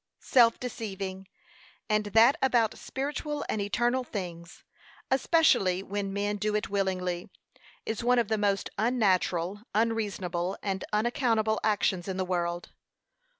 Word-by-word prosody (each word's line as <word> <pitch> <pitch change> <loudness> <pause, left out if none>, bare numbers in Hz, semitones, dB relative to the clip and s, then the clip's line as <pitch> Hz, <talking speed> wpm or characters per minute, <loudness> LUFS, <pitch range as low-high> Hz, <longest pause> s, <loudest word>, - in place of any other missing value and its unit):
Self 235 -3 +4
deceiving, 195 -6 -5 0.6
and 215 -1 +1
that 225 +6 +5
about 240 -5 +2
spiritual 290 +2 -4
and 215 - -1
eternal 240 +5 0
things, 175 -7 -7 0.5
especially 265 - +3
when 200 0 -3
men 205 +1 -1
do 210 +1 -1
it 210 - -2
willingly, 185 -3 -1 0.6
is 220 +1 -3
one 250 +1 +3
of 235 -3 +2
the 220 - 0
most 200 -1 0
unnatural, 200 -5 +1
unreasonable, 200 -5 -1
and 195 -2 -2
unaccountable 220 0 +1
actions 200 -4 +1
in 190 -1 -3
the 185 - -1
world. 175 -1 -2
205 Hz, 125 wpm, -28 LUFS, 190-230 Hz, 0.6 s, that